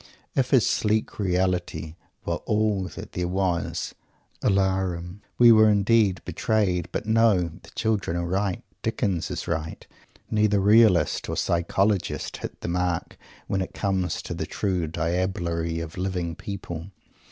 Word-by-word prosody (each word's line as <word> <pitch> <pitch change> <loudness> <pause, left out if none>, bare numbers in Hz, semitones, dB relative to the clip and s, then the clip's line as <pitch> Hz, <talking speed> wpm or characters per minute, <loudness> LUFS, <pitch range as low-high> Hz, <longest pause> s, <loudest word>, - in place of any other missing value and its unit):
If 130 -2 +2
his 130 -4 +5
sleek 110 0 0
"reality" 90 -4 0 0.3
were - - -1
all 105 -3 +1
that - - -8
there 90 0 -2
was 90 -2 -1 0.5
"alarum!" 95 -2 0 0.2
We 120 -1 +8
were 110 -1 +7
indeed 100 -2 +3
"betrayed"! 90 -6 0
But - - -3
no; 110 -6 +3
the - - -15
children 105 -6 0
are 85 - -1
right. 95 +1 -1 0.2
Dickens 90 -5 -1
is - - -4
right. 80 -1 -3 0.5
Neither 105 -2 +3
"realist" 100 -5 +4
or - - -2
"psychologist" 95 +2 0
hits - - -7
the - - -4
mark, 90 0 -1 0.3
when 95 - -1
it 95 - -5
comes 95 -3 -1
to - - -5
the - - -4
true 90 -5 -1
diablerie 85 0 -1
of 80 +2 -8
living 90 -3 -2
people. 90 -2 -6
95 Hz, 140 wpm, -25 LUFS, 85-105 Hz, 0.5 s, We